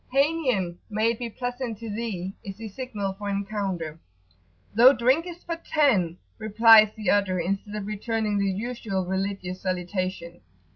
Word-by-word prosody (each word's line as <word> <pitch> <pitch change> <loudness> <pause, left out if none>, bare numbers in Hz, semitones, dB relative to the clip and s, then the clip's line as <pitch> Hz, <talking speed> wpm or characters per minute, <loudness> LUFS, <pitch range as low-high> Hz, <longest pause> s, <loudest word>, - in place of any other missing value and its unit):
"Hanien," 260 - +1
may 215 +2 +2
it 230 - -6
be 240 -1 -3
pleasant 245 -1 -4
to 230 - -8
thee![FN#20] 205 -4 -4 0.2
is 195 - -7
the 225 0 -7
signal 205 -4 -4
for 205 +1 -6
encounter. 195 -5 -3 0.8
[p.84]"Thou 245 +5 +8
drinkest 330 +9 +1
for 335 -1 -3
ten," 230 - +2 0.2
replies 220 0 +7
the 215 -3 +1
other, 195 -3 +2
instead 195 +4 -2
of 210 -2 -4
returning 215 0 -1
the 200 0 +1
usual 205 -2 -3
religious 190 0 -3
salutation. 185 -1 -3
210 Hz, 145 wpm, -26 LUFS, 190-235 Hz, 0.8 s, p.84]"Thou